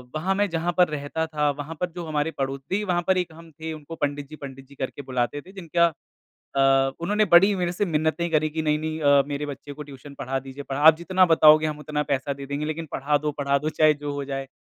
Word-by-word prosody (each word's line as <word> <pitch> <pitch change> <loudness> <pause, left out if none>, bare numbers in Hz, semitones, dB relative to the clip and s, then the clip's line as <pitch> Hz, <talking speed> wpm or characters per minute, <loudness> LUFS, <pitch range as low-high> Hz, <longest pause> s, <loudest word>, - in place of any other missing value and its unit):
वहाँ 185 +5 0
मैं 205 +1 +1
जहाँ 170 +1 -1
पर 180 -1 +6
रहता 150 +2 -3
था 150 -2 0
वहाँ 145 +3 -7
पर 180 - -1
जो 175 -1 -5
हमारे 155 0 -1
पड़ो 135 0 -2
देखिए, 185 +10 -3
वहाँ 175 -2 +1
पर 190 -1 +3
एक 180 -3 -2
हम 165 0 -14
थे 160 +1 -6
उनको 155 +1 -9
पंडित 145 -2 -2
जी, 155 - -9
पंडित 135 -2 -10
जी 140 - -16
करके 135 +1 -5
बुलाते 130 +1 -2
थे 185 - -15
जिनका 170 -3 +1 0.7
अ, 135 0 +4
उन्होंने 210 +5 +1
बड़ी 195 +4 +7
मेरे 175 -2 -1
से 180 +3 -1
मिन्नतें 160 0 0
करी 155 -1 +2
कि 160 +1 -3
नहीं, 150 -1 +1
नहीं 155 0 -4
अ, 140 -1 +5
मेरे 145 0 -3
बच्चे 145 0 -8
को 150 +1 -8
ट्यूशन 140 0 -12
पढ़ा 135 +1 -2
दीजिए, 135 +2 -9
पढ़ा 135 +1 -2
आप 160 +1 +8
जितना 185 +2 +3
बताओगे 155 -2 +6
हम 150 -1 -4
उतना 150 0 -2
पैसा 135 +1 -1
दे 140 0 -8
देंगे 140 +2 -3
लेकिन 155 +2 -4
पढ़ा 145 +2 +1
दो 150 +1 -2
पढ़ा 140 0 +2
दो 150 +2 -2
चाहे 155 0 +4
जो 145 0 -5
हो 145 0 -3
जाए। 135 0 -4
150 Hz, 250 wpm, -24 LUFS, 140-165 Hz, 0.7 s, आप